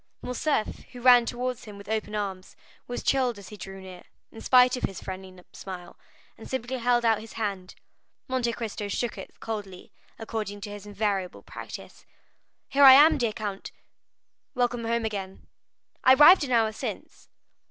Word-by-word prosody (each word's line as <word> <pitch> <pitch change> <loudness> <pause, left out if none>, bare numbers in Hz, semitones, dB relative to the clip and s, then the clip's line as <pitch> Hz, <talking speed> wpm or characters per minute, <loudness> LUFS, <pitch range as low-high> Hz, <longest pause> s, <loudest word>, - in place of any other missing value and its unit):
Morcerf, 250 -1 -1
who 250 - -9
ran 245 -1 +6
towards 250 0 -3
him 210 -2 -10
with 200 - -12
open 215 0 -3
arms, 195 -3 -5 0.3
was 245 - -5
chilled 255 -4 +1
as 200 -2 -11
he 210 - -9
drew 195 -1 -9
near, 185 -2 -11 0.3
in 225 - -11
spite 250 0 +5
of 250 - -6
the 195 - -2
friendly 185 0 -8
smile, 180 -2 -9 0.4
and - - -11
simply 260 0 -3
held 240 0 +2
out 225 -2 +3
his 225 - -12
hand. 195 -4 -4 0.5
Monte 255 -3 0
Cristo 215 -3 -5
shook 235 +3 -2
it - - -11
coldly, 205 -5 -7 0.3
according 220 -2 -5
to 205 0 -6
his 205 0 -9
invariable 200 -3 -2
practice. - - -10 0.7
"Here 280 +1 +3
I 265 -1 +11
am, 295 +2 +7
dear 235 -3 +1
count." 205 -2 -6 0.8
"Welcome 245 -1 0
home 230 0 0
again." 195 -3 -5 0.6
"I 260 - +7
arrived 300 +5 +8
an 265 - -4
hour 225 -2 +3
since." 220 - -7
220 Hz, 165 wpm, -26 LUFS, 200-245 Hz, 0.8 s, I